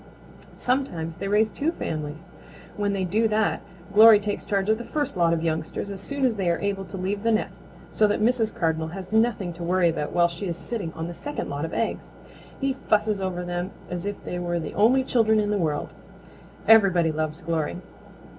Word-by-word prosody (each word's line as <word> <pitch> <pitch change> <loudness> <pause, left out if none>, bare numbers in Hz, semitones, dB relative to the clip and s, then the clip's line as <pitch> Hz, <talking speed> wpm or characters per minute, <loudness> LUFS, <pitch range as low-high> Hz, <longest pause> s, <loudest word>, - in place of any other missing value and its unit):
Sometimes 175 -12 -1
they 195 - -4
raise 210 +2 +3
two 310 +3 -1
families. 155 - -5 0.5
When 205 -1 0
they 195 -1 -1
do 215 +5 +2
that, 215 0 +1 0.3
Glory 215 0 +9
takes 205 0 -3
charge 195 -1 -1
of 220 +1 +2
the - - -5
first 290 +1 -2
lot 170 -2 +3
of 165 -1 0
youngsters 160 +4 -2
as 195 -1 -6
soon 280 +5 -1
as 235 -4 +1
they 185 -3 0
are 170 - +2
able 200 -1 -2
to 190 +1 -8
leave 195 +2 -2
the 230 +1 +2
nest 220 - -1 0.3
so 215 - +3
that 205 - 0
Mrs. 225 0 +2
Cardinal 160 -1 -1
has 185 +3 -8
nothing 220 -5 +1
to 170 +1 -8
worry 175 0 +3
about 150 -2 -2
while 175 0 +4
she 175 +3 -5
is 170 -1 -3
sitting 205 -9 -4
on 160 0 -5
the 175 - -6
second 290 +11 -5
lot 145 +2 -3
of 165 - -7
eggs. 230 - -2 0.5
He 275 -1 0 0.2
fusses 210 -1 +2
over 180 -2 -3
them 175 +1 -3 0.2
as 180 +2 -3
if 205 - -2
they 180 - -4
were 175 -1 -1
the 160 - -5
only 255 +6 +4
children 220 -4 +3
in 210 0 0
the 205 - +1
world. 150 -4 -1 0.8
Everybody 190 -7 +6
loves 155 +2 -3
Glory. 165 -1 -2
195 Hz, 210 wpm, -25 LUFS, 170-220 Hz, 0.8 s, Glory